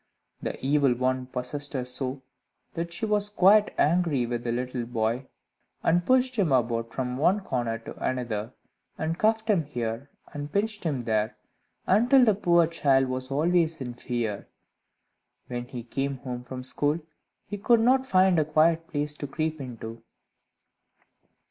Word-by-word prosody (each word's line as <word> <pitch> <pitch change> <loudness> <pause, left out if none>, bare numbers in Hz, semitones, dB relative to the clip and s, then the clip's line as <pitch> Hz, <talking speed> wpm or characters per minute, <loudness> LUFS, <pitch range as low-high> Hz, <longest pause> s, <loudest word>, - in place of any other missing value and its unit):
The - - -4
Evil 140 -2 +3
One 130 +1 -1
possessed 140 +3 -4
her 130 -2 -2
so, 130 +1 -3 0.5
that 170 +1 -4
she 175 +5 -2
was 210 -1 +1
quite 205 +1 +5
angry 155 -5 +2
with 120 0 -3
the 120 - -1
little 125 0 -3
boy, 115 +2 -1 0.6
and 175 +2 +3
pushed 255 +2 +2
him 185 -8 +2
about 115 -2 +1
from 125 -1 -3
one 185 +8 +3
corner 120 -9 -2
to 115 - -10
another, 120 -3 -2 0.5
and 160 +2 -2
cuffed 220 +1 +2
him 200 -7 +3
here 120 -1 -4 0.2
and 145 0 -6
pinched 210 -1 -1
him 140 -6 0
there, 110 -1 0 0.5
until 245 +6 +5
the 215 - +5
poor 175 -3 +3
child 135 -5 +2
was 130 0 -3
always 165 +3 +1
in 125 -2 -5
fear. 120 -4 -3 1.0
When 120 0 -5
he 125 -2 -7
came 135 +3 -3
home 125 -2 -6
from 130 +1 -7
school, 145 +4 0 0.5
he 205 - -6
could 235 +3 +4
not 260 +3 +3
find 185 -4 +4
a 155 - +2
quiet 160 +2 +2
place 150 -2 -2
to 145 -1 -6
creep 155 +1 -3
into. 115 -3 -8
140 Hz, 155 wpm, -27 LUFS, 125-175 Hz, 1.0 s, quite